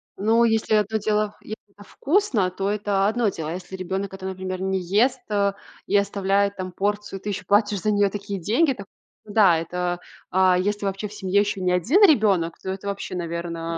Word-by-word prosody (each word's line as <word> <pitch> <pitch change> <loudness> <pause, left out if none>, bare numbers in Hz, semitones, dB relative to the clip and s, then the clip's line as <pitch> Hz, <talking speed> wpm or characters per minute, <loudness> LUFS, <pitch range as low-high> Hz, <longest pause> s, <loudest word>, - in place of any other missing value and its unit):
Ну, 225 +3 +3
если 220 -1 +1
одно 215 +1 +1
дело, 210 0 0
если 215 - -7 0.2
это 205 - -14
вкусно, 275 - 0
то 195 +2 -3
это 205 -2 +1
одно 225 0 +1
дело. 160 -4 -5
А - - -3
если 185 +1 -7
ребёнок 190 +1 -4
это, 190 0 -8
например, 185 0 -4
не 190 0 0
ест, 230 +8 +1
э, 200 -1 +1 0.3
и 205 - -1
оставляет 200 0 +1
там 185 0 -5
порцию, 205 +1 -2
и - - -27
ты 210 - -3
ещё 195 - -4
платишь 205 -1 +2
за 215 - +1
неё 205 -1 +3
такие 200 0 -5
деньги, 255 - +2
так, 200 -4 -10 0.4
да, 205 -5 +4
это 175 +1 -3 0.3
А 185 -1 +4
если 205 +2 -1
вообще 195 +2 -2
в 205 - -13
семье 200 -1 +1
ещё 205 -2 -2
не 180 - +1
1 235 - +3
ребёнок, 200 - +4
то - - -7
это 190 +1 -5
вообще, 200 -2 -4
наверно, 170 -1 -4
200 Hz, 205 wpm, -23 LUFS, 185-210 Hz, 0.4 s, да